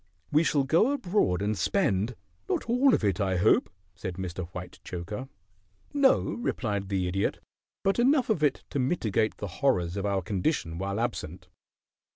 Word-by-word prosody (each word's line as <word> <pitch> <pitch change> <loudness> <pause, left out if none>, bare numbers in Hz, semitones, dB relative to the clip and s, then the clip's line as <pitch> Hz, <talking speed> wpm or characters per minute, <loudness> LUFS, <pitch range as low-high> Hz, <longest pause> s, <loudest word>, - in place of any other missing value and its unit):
We 150 +2 +4
shall 145 -3 +2
go 170 - +3
abroad 175 - +1
and 105 +1 0
spend 105 - +1 0.2
" 85 +5 -36
"Not - - 0
all 250 +2 +4
of - - -3
it, 100 0 +1
I 95 -2 +1
hope?" 100 +5 +4 0.2
said 90 0 -6
Mr. 90 -1 -5
Whitechoker. 90 +6 -7 0.6
"No," 280 -2 +5
replied 105 - -2
the 95 -2 0
Idiot. 95 +2 0 0.5
"But 195 +4 +2
enough 255 -1 +3
of 175 - 0
it 145 -3 +2
to 140 - -1
mitigate 115 - 0
the - - -4 0.2
horrors 90 -10 +2
of 100 +1 -1
our 100 -2 0
condition 90 - -1
while 100 +2 -2
absent." 120 +1 -4
105 Hz, 165 wpm, -28 LUFS, -, 0.6 s, No